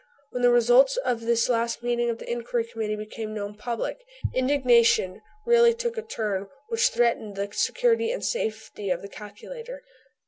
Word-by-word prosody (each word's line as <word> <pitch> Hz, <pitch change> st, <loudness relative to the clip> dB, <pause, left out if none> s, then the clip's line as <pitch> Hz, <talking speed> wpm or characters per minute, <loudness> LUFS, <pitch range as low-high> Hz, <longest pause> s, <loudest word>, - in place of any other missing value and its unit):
When 250 Hz, -, -3 dB
the 245 Hz, -, +6 dB
results 245 Hz, +3 st, +5 dB
of 250 Hz, -3 st, -1 dB
this 230 Hz, 0 st, +2 dB
last 235 Hz, -1 st, 0 dB
meeting 240 Hz, 0 st, 0 dB
of 230 Hz, -, -2 dB
the -, -, -10 dB
Inquiry 235 Hz, 0 st, -1 dB
Committee 220 Hz, -2 st, -3 dB
became 215 Hz, +1 st, -6 dB
known 205 Hz, 0 st, -4 dB
public 235 Hz, -, -4 dB, 0.3 s
indignation 240 Hz, -7 st, +3 dB, 0.2 s
really 470 Hz, -1 st, +5 dB
took 475 Hz, 0 st, -3 dB
a 450 Hz, -, -3 dB
turn 210 Hz, -, -3 dB, 0.2 s
which 455 Hz, 0 st, +3 dB
threatened 230 Hz, -3 st, 0 dB
the 200 Hz, +1 st, -3 dB
security 465 Hz, -2 st, +1 dB
and -, -, -3 dB
safety 220 Hz, -, -3 dB
of 180 Hz, 0 st, -1 dB
the -, -, -6 dB
calculator. 465 Hz, -, -10 dB
235 Hz, 165 wpm, -26 LUFS, 215-280 Hz, 0.3 s, the